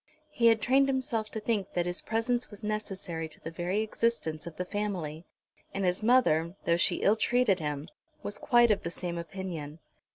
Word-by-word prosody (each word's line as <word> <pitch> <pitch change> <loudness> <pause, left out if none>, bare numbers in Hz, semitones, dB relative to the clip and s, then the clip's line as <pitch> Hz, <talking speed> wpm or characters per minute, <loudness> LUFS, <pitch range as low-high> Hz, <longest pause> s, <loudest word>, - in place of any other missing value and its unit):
He 235 -5 +3
had 225 -1 +4
trained 270 +2 +4
himself 245 -5 -1
to 220 - -4
think 210 -3 -1
that 175 -1 +1
his 175 0 -2
presence 235 +2 0
was 205 0 -11
necessary 190 -6 -3
to - - -10
the 165 - -7
very 175 +5 -1
existence 215 -8 -1
of 165 - -8
the 180 - -3
family; 180 -6 -3 0.5
and 195 -1 0
his 180 +2 +1
mother, 190 -8 +3
though 170 0 +3
she - - +2
ill 205 - +5
treated 230 -4 +2
him, 150 -1 -3 0.4
was 205 - -4
quite 240 -2 +5
of 205 - +2
the 170 - -3
same 170 0 -4
opinion. 170 -4 -6
195 Hz, 190 wpm, -30 LUFS, 170-225 Hz, 0.5 s, ill